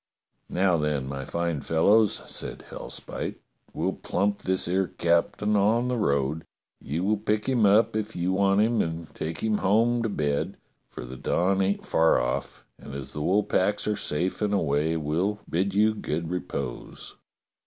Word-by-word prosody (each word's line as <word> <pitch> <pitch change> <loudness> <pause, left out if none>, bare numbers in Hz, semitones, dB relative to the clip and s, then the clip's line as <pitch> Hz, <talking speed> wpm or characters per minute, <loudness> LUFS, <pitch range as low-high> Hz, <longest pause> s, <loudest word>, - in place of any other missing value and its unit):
"Now, 90 -2 +2
then, 75 -3 -1
my 70 0 -5
fine 85 -2 -2
fellows," 100 +8 +3
said - - -5
Hellspite, - - -6 0.4
"we'll - - -1
plump 100 +2 -1
this 95 -1 0
'ere 95 +1 +1
captain 100 +5 +1
on 110 +5 +3
the 125 - 0
road. 70 - 0 0.4
You 80 +6 -3
will 105 +2 +2
pick 105 +1 -1
him 120 -6 +3
up 105 +2 +4
if 110 0 -3
you 90 +2 0
want 100 +1 +3
him 115 0 +2
and 80 -1 -4
take 80 +1 -5
him 110 -1 +1
home 115 +5 +3
to 115 - -1
bed, 75 -7 -1 0.3
for - - -8
the 65 +1 -8
dawn 95 +7 +1
ain't 95 +1 0
far 80 0 +3
off, 60 - -3
and 70 - -9
as 70 -1 -6
the 75 - -4
wool 100 +7 +2
packs 100 +2 +1
are 105 - +1
safe 90 +5 -2
and 105 -1 +1
away, 80 -1 +1
we'll 85 +7 -1
bid 95 +4 -1
you 110 +1 +4
good 85 -4 -3
repose." 70 -8 -5
95 Hz, 170 wpm, -26 LUFS, 80-105 Hz, 0.4 s, up